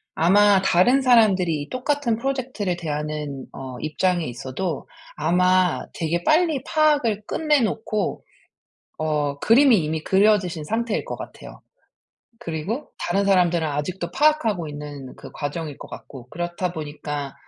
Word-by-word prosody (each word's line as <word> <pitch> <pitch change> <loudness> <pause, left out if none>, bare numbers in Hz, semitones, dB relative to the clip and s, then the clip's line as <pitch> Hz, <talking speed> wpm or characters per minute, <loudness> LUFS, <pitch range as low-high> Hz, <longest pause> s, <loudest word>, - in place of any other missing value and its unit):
아마 200 +3 +5
다른 215 +10 +4
사람들이 190 - +3
똑같은 255 -2 -1
프로젝트를 250 -7 -2
대하는 150 -4 -4
어 130 -2 -7
입장에 175 +2 0
있어도 135 +7 -4 0.3
아마 180 +3 +2
되게 170 +1 -1
빨리 310 - +2
파악을 290 -9 +2
끝내 305 -3 +2
놓고 215 -1 -2 0.8
어 150 -2 -1
그림이 245 0 +5
이미 155 0 -2
그려지신 190 -5 +2
상태일 225 +5 -1
것 - - -5
같아요. - - -10 0.8
그리고 190 - -4
다른 195 +3 0
사람들은 175 -4 +3
아직도 155 +5 -3
파악하고 230 - +2
있는 145 -2 -8
그 - - -11
과정일 145 0 -5
것 - - -10
같고. 125 -3 -11
그렇다 175 +1 -3
보니까 145 -3 -5
180 Hz, 300 characters per minute, -23 LUFS, 150-225 Hz, 0.8 s, 아마